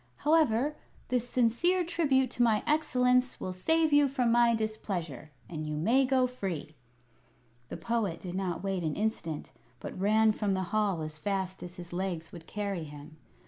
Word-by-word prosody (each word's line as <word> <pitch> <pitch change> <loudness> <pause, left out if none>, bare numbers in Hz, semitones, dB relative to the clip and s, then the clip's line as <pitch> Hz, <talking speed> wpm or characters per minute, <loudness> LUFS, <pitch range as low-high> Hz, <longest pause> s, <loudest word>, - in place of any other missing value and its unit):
However, 295 -3 +2 0.3
this 245 -1 0
sincere 255 +11 +2
tribute 275 -7 +1
to 245 - -2
my 225 -3 +3
excellence 250 -4 +2
will 185 - -4
save 320 - +2
you 290 -1 +6
from 255 -3 +1
my 235 0 +5
displeasure, 195 - -4 0.2
and 155 -2 -5
you 150 0 -3
may 240 - +3
go 260 -1 +3
free." 195 - -4 1.0
The - - -5
Poet 225 -7 -1
did 180 -2 -7
not 185 -2 -2
wait 195 -2 -1
an 155 -3 -2
instant, 205 -8 -3 0.3
but - - -7
ran 215 +3 +4
from 210 -2 -1
the 190 - -1
hall 200 -6 +1
as 155 0 -6
fast 190 +1 -2
as 175 0 -8
his 175 -2 -9
legs 175 -3 -3
would 170 -1 -11
carry 200 -5 -3
him. 150 +1 -11
215 Hz, 170 wpm, -30 LUFS, 175-250 Hz, 1.0 s, you